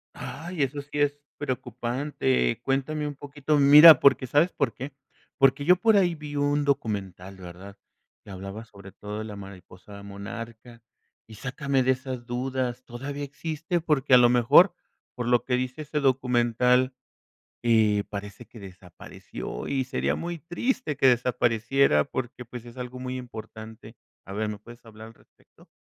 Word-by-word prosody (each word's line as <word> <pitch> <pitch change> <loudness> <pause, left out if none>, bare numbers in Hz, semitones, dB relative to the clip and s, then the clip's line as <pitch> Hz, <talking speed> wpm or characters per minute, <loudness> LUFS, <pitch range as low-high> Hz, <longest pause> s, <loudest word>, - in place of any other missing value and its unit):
Ay, 160 +4 -6
eso 140 +2 -3
sí 145 +1 -6
es 145 0 +1 0.2
preocupante. 125 - -2
Cuéntame 150 +3 -1
un 145 - -6
poquito. 145 +1 -2
Mira, 150 +2 +9
porque, 135 -2 +4
¿sabes 155 +6 +3
por 130 -7 -1
qué? 135 +5 -8 0.4
Porque 135 +1 +3
yo 180 - +6
por 215 +3 +3
ahí 175 -3 +3
vi 150 -1 -8
un 145 0 +1
documental, 95 -7 -3
¿verdad?, 95 +2 -11 0.5
que - - -16
hablaba 100 +4 -8
sobre 100 -3 -14
todo 105 +1 -7
de 110 - -5
la 105 -2 -8
mariposa 100 0 -12
monarca 115 +3 -9 0.5
y 110 - -12
sácame 135 +3 -1
de 130 - +3
esas 130 -2 -5
dudas, 125 0 -3
¿todavía 140 +4 -6
existe? 160 +4 -3
Porque, 145 -5 +1
a - - +10
lo 120 -1 +6
mejor 125 - +5 0.4
por 120 -1 -4
lo 120 -1 +3
que 125 - 0
dice 130 +4 -3
ese 150 0 -3
documental, 125 -1 +2 0.7
eh, 110 -3 +3
parece 100 +3 -8
que 115 - -14
desapareció, 90 -9 -9
y 135 -1 0
sería 130 0 -1
muy 170 0 -5
triste 175 - -2
que 135 - +4
desapareciera 120 - +2
porque, 125 +3 -6
pues, 120 0 -10
es 120 +2 -13
algo 125 0 -7
muy 130 0 -5
importante. 110 -2 -10 0.3
A 95 - -9
ver, 105 +1 -2
¿me 105 - -5
puedes 120 +3 -15
hablar 110 0 -12
al 115 - -14
respecto? - - -25
125 Hz, 160 wpm, -26 LUFS, 110-145 Hz, 0.7 s, a